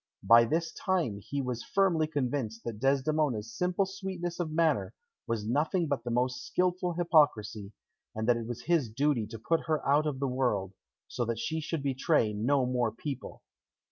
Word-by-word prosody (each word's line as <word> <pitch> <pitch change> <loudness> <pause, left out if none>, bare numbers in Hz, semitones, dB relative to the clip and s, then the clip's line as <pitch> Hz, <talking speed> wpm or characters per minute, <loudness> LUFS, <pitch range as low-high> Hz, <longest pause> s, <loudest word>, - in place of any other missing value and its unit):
By 115 +4 +7
this 160 +6 -1
time 165 - -1
he 140 +7 -4
was 125 -2 -3
firmly 175 -6 +2
convinced 125 -6 -2
that 115 -3 -5
Desdemona's 135 -4 +1
simple 180 - +1
sweetness 190 -3 -5
of 170 -3 -1
manner 160 0 +1 0.3
was 115 -3 -2
nothing 155 - +1
but 140 -6 -2
the 120 - -4
most 125 +1 0
skilful 180 -1 0
hypocrisy, 130 - +2 0.4
and 110 +1 -2
that 120 - +5
it 115 -1 -5
was 120 -1 -6
his 165 -9 +1
duty 125 -1 0
to 115 +1 -8
put 160 +11 -1
her 155 -1 0
out 145 +2 +3
of 140 -3 -3
the 140 - 0
world, 120 -7 0 0.3
so 125 - -2
that 115 0 -2
she 155 +8 -2
should 155 -1 -3
betray 135 -4 +1
no 125 +6 +1
more 125 -2 0
people. 135 +3 -7
135 Hz, 175 wpm, -30 LUFS, 115-160 Hz, 0.4 s, By